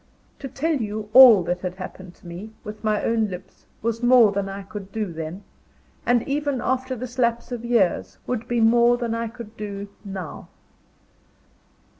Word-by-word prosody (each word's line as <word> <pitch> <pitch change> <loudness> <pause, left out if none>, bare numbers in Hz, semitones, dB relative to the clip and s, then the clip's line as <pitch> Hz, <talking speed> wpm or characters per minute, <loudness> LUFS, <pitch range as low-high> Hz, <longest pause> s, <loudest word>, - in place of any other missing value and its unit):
To 275 - -5
tell 305 +4 -1
you 215 -2 -4
all 245 -7 +9
that 175 +1 -2
had 180 -1 -4
happened 185 -1 -9
to - - -23
me, 175 +6 -7
with 210 +1 -9
my 215 -1 +1
own 225 -2 +1
lips, 185 0 -10 0.2
was 230 0 -1
more 240 -3 +6
than 200 -1 -2
I 195 +1 -6
could 195 0 -9
do 210 -6 -3
then 165 +5 -6 0.6
and 240 -1 +2
even 285 -1 -1
after 260 +1 -1
this 250 +1 -7
lapse 235 0 0
of 240 -2 -4
years, 235 -7 +1
would 245 -2 -3
be 240 -1 0
more 235 +2 +5
than 235 -2 -2
I 230 0 -2
could 230 -1 -10
do 205 -1 -6
now. 190 -5 -7
220 Hz, 175 wpm, -23 LUFS, 195-240 Hz, 0.6 s, all